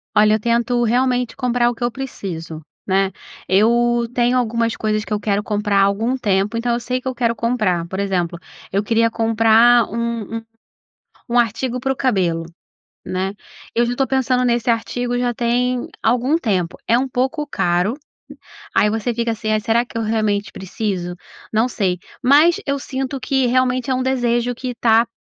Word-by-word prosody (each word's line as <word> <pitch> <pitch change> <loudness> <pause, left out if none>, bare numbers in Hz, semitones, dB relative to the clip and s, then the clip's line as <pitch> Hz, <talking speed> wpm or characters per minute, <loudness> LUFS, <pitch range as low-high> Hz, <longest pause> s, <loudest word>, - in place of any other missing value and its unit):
Olha, 210 0 +5
eu - - -1
tento 235 +2 +1
realmente 245 0 +1
comprar 245 -2 +1
o 240 - -4
que 235 - -6
eu 240 - +1
preciso, 175 -11 -6 0.3
né? 195 0 +2 0.4
Eu 235 +4 +3
tenho 245 +1 +2
algumas 230 -1 0
coisas 215 0 -1
que - - -4
eu 210 - 0
quero 205 0 0
comprar 205 -1 0
há - - +6
algum 225 +6 +1
tempo, 205 -1 0
então 235 +1 0
eu 240 - 0
sei 250 +1 -2
o - - -6
que 260 - -7
eu 260 - -2
quero 235 -1 0
comprar, 215 -8 0
por 190 +2 -5
exemplo, 180 -3 -1 0.3
eu 200 +2 0
queria 230 +1 +2
comprar 225 +1 +4
um 230 -1 -3
um - - -6 0.9
um 245 - +3
artigo 240 +2 0
pro 270 +1 -1
cabelo, 185 -11 0 0.6
né? 190 +2 -2 0.4
Eu 235 - +3
já 245 - -1
tô 270 +1 0
pensando 255 -1 +1
nesse 240 -1 +1
artigo 240 +2 -1
já 245 -1 0
tem 245 +1 0
algum 250 +7 +2
tempo 190 - -1
é 235 +2 +4
um 265 - 0
pouco 265 +5 -1
caro 180 -4 0 0.8
aí 210 - +4
você 225 +2 -1
fica 235 0 0
assim: 220 -1 -5
"Ai, 215 - +3
será 230 +2 +1
que 235 - -12
eu - - -1
realmente 215 -2 0
preciso?". 185 -2 -4 0.4
Não 220 +2 +3
sei, 185 -6 -1 0.2
mas 295 +6 +5
eu 280 0 0
sinto 270 0 -4
que 265 0 0
realmente 255 +1 +1
é - - +2
um 255 - 0
desejo 245 -2 0
que 250 0 -5
tá 230 0 +4
235 Hz, 185 wpm, -19 LUFS, 210-250 Hz, 0.9 s, há